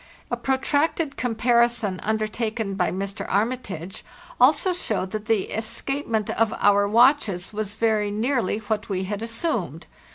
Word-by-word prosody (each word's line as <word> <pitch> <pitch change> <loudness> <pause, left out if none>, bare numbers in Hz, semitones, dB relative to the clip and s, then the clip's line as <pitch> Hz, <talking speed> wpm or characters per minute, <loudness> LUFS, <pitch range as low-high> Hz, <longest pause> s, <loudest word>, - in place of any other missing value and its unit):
A - - +2
protracted 285 +3 0
comparison 235 -4 +1
undertaken 220 -1 -2
by 180 -2 +1
Mr. 195 +2 -4
Armitage 200 -5 -2 0.4
also 290 +8 +4
showed 215 - -2
that 215 -1 -4
the 215 -3 0
escapement 225 -1 -2
of 225 -1 +1
our 205 0 +4
watches 220 -5 +3
was 210 -1 -3
very 220 -2 +1
nearly 225 0 0
what 215 0 -3
we 190 -1 -1
had 205 +2 -4
assumed. 230 +9 -2
220 Hz, 130 wpm, -24 LUFS, 205-245 Hz, 0.4 s, also